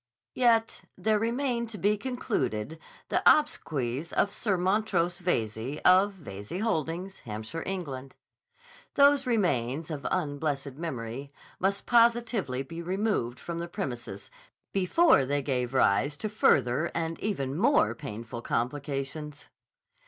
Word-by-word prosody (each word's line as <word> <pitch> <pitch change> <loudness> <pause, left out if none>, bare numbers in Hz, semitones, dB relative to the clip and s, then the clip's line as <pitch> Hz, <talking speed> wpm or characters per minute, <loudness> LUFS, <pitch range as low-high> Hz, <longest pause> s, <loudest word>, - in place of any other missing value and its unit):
Yet 230 -3 +2 0.2
there 215 -1 +2
remained 235 +1 -1
to 220 - -7
be 205 +3 +2
concluded 205 - -2 0.3
the - - +1
obsequies 155 - -1
of 200 - +1
Sir 200 -2 0
Montrose 180 -2 +1
Veyze, 120 - -1
of 190 +3 +6
Veyze 105 - -7
Holdings, 185 -2 -2
Hampshire, 110 +8 -6
England. 140 -9 -5 0.8
Those 280 -1 +5
remains, 155 - 0
of 145 -3 -4
unblessed 145 -4 -2
memory, 135 -3 -5 0.3
must 200 +2 0
positively 230 - +2
be 165 +5 -7
removed 180 - -1
from 170 -1 -5
the 170 - -4
premises 120 - -6 0.4
before 195 - +4
they 140 +2 -1
gave 125 -3 -1
rise 135 +3 +2
to 215 - -3
further 140 - +3
and 165 0 -2
even 140 -11 -2
more 245 - +3
painful 115 -4 -7
complications. 140 +4 -3
165 Hz, 120 wpm, -28 LUFS, 135-210 Hz, 0.8 s, of